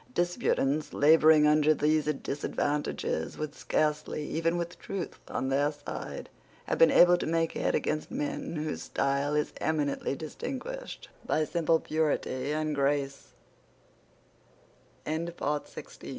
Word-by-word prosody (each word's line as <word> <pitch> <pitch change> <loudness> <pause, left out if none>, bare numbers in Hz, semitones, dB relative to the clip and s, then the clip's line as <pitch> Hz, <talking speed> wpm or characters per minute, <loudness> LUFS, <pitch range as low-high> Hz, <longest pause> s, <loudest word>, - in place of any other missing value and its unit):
Disputants 175 - 0
labouring 155 0 +6
under 150 0 +4
these 155 +1 +2
disadvantages 145 - -2
would 155 -1 -4
scarcely, 150 0 -1
even 165 +3 0
with 170 +1 -4
truth 195 -3 -5
on 130 - -2
their 140 +2 +2
side, 145 -1 -7 0.4
have - - -2
been - - +8
able 175 0 +6
to - - -3
make 165 0 +1
head - - 0
against 155 0 -1
men 150 +3 -3
whose 155 0 -3
style 140 +2 0
is 150 0 0
eminently 145 -3 0
distinguished 270 - -6
by 155 - +1
simple 165 0 +2
purity 145 -3 -1
and 155 0 -1
gra 140 0 +1
155 Hz, 115 wpm, -29 LUFS, 145-160 Hz, 0.4 s, been